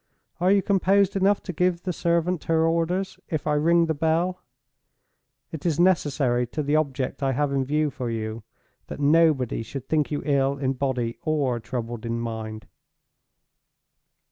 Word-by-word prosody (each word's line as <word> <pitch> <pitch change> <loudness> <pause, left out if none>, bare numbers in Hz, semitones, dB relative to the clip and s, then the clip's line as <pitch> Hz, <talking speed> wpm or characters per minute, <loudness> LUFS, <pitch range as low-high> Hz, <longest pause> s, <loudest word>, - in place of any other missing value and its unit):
Are 180 +2 +3
you 200 -1 +4
composed 200 0 +2
enough 195 +1 +2
to 180 - -5
give 180 +1 0
the 180 - -2
servant 170 +1 0
her 160 0 +2
orders, 175 +4 -1
if 155 -5 -2
I 150 - +1
ring 165 +3 +3
the 160 - 0
bell? 165 +4 0 1.1
It 160 -3 -7
is 170 -2 0
necessary 145 -9 +2
to 150 +5 -3
the 145 +2 +1
object 140 -4 -1
I 135 -1 +1
have 145 +2 0
in 135 -1 +1
view 150 +2 0
for 125 -2 -4
you, 110 0 -4 0.5
that - - -7
nobody 145 -5 +3
should 130 +3 -7
think 155 -2 +1
you 145 - -3
ill 140 -1 +1
in 135 -1 0
body 125 -3 -2
or 140 -6 0
troubled 120 -1 -5
in 115 0 -2
mind. 110 -2 -5
150 Hz, 165 wpm, -25 LUFS, 130-170 Hz, 1.1 s, you